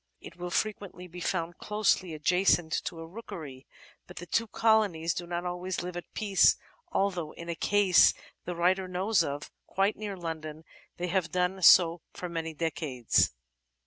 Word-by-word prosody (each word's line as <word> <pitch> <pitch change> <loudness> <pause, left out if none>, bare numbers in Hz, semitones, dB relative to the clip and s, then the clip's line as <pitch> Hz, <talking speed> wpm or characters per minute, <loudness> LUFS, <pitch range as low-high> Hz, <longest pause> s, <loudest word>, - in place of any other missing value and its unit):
It 170 - -12
will 175 0 -5
frequently 200 -1 -3
be 180 0 -10
found 170 -1 -2
closely 210 -5 0
adjacent 175 +1 +2
to 165 - -5
a - - -7
rookery, 165 - -9 0.4
but - - -13
the 175 - -6
two 230 +6 0
colonies 210 -8 +2
do 175 +1 -5
not 175 0 -3
always 180 0 -3
live 180 0 -6
at 175 - -7
peace, 200 -3 +4 0.3
although 180 -6 -1
in 170 0 -9
a 170 - -2
case 195 +1 +4 0.3
the 180 - -4
writer 185 +2 +1
knows 185 +1 +1
of, 145 -1 -5 0.2
quite 195 +2 +1
near 205 -2 -6
London, 160 -2 -6 0.3
they 180 +1 -3
have 175 -3 0
done 180 +2 0
so 170 -1 +7
for 180 -2 -6
many 165 -2 -4
decades. 145 -7 +1
175 Hz, 165 wpm, -29 LUFS, 165-190 Hz, 0.4 s, so